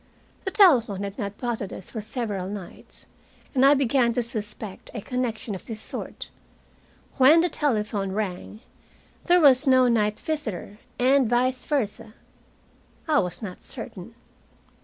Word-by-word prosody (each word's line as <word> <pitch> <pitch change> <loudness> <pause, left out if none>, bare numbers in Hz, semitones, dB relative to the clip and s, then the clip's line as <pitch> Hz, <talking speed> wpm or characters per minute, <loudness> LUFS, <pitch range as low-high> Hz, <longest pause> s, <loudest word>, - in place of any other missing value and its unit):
The - - 0
telephone 245 - +4
had 200 +4 -6
not 200 -2 -4
bothered 235 -5 -3
us 185 - -10
for 220 - -4
several 210 -4 -4
nights, 200 -3 -10 0.5
and 260 -2 +3
I 280 +2 +7
began 255 -3 +2
to 245 - 0
suspect 215 -4 -5
a 225 - -4
connection 240 -2 -3
of 190 - -8
this 225 -2 -6
sort: - - -7 0.9
when 290 +5 +7
the 350 - +1
telephone 210 -10 -1
rang, 205 +1 -4 0.6
there 355 0 +5
was 280 -2 +5
no 255 -1 +5
night 215 -3 +1
visitor, 220 - -4 0.2
and 260 -1 +3
vice 250 +1 +1
versa. 225 -5 -2 0.9
I 305 -2 +4
was 180 +3 -3
not 185 -3 -7
certain. 230 -4 -8
230 Hz, 140 wpm, -25 LUFS, 205-265 Hz, 0.9 s, I